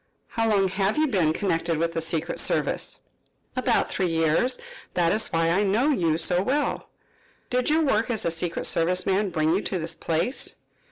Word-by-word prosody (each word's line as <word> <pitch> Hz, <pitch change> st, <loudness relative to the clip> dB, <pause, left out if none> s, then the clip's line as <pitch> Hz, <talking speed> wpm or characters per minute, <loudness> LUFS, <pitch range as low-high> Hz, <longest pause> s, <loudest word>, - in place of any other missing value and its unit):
"How 225 Hz, -1 st, 0 dB
long 195 Hz, -2 st, +3 dB
have 195 Hz, +4 st, 0 dB
you 310 Hz, -, +3 dB
been 185 Hz, -, +2 dB
connected 165 Hz, -2 st, -1 dB
with 165 Hz, +1 st, -1 dB
the 165 Hz, -, -2 dB
secret 165 Hz, +1 st, 0 dB
service?" -, -, 0 dB, 0.6 s
"About -, -, +1 dB
three 185 Hz, -, 0 dB
years. 165 Hz, +10 st, +1 dB, 0.4 s
That 170 Hz, -2 st, +2 dB
is 215 Hz, -, +2 dB
why 165 Hz, 0 st, +1 dB
I 185 Hz, +4 st, +2 dB
know 210 Hz, +8 st, +2 dB
you 165 Hz, -, +1 dB
so 175 Hz, +2 st, +2 dB
well." 275 Hz, +8 st, -1 dB, 0.6 s
"Did 250 Hz, +2 st, +1 dB
your 315 Hz, +1 st, +3 dB
work 230 Hz, -6 st, +1 dB
as 225 Hz, -3 st, -2 dB
a 170 Hz, -, +1 dB
secret 165 Hz, +1 st, -2 dB
service 180 Hz, +2 st, +1 dB
man 195 Hz, +1 st, +1 dB
bring 160 Hz, -2 st, +1 dB
you 190 Hz, -, +1 dB
to 190 Hz, -, -2 dB
this 165 Hz, 0 st, -2 dB
place?" 170 Hz, +10 st, -2 dB
180 Hz, 185 wpm, -25 LUFS, 165-215 Hz, 0.6 s, long